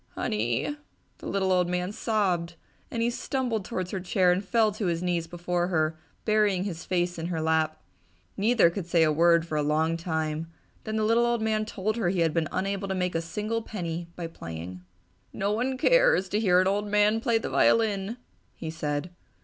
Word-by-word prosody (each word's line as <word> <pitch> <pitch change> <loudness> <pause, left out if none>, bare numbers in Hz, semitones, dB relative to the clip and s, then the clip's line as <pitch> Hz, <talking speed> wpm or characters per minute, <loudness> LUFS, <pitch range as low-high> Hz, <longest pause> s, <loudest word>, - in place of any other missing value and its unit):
"Honey!" 120 - -1 0.4
the - - -8
little 190 -1 0
old 180 -1 +2
man 180 +1 -1
sobbed, 190 -7 0 0.3
as - - -5
he 235 +1 +1
stumbled 240 -4 -2
towards 185 -4 -4
her 190 - -2
chair 180 0 +2
and 180 +3 0
fell 220 +1 +2
to 205 -1 -3
his 170 0 -1
knees 175 -2 -1
before 175 +1 -1
her, 160 -3 +1 0.3
burying 210 -4 +2
his 175 -4 -5
face 175 -1 -1
in 165 - -3
her 170 -2 -2
lap. 160 0 +1 0.6
Neither 210 -4 +4
could 175 -1 -5
say 170 -1 +4
a 155 - +3
word 170 +1 +4
for 155 -2 -3
a - - +2
long 155 +3 +1
time, 160 -1 -2 0.4
then 220 - -3
the 220 - +1
little 230 +2 +3
old 235 -2 0
man 215 -1 +1
told 215 +1 -2
her 205 -7 +1
he 180 -1 0
had 165 -2 +2
been 165 -2 +1
unable 195 +1 -2
to 190 - -2
make 180 -1 -1
a 165 - 0
single 210 +7 -3
penny 170 -6 -5
by 175 - -5
playing. 90 - -7 0.5
"No 200 +1 -1
one 250 +5 -1
cares - - +4
to 210 - 0
hear 180 -5 +4
an 185 - +3
old 205 +2 0
man 210 +2 +3
play 235 -2 +2
the 225 - -3
violin!" 215 0 +2 0.4
he 160 - -5
said. 150 +1 -3
180 Hz, 200 wpm, -27 LUFS, 165-215 Hz, 0.6 s, Neither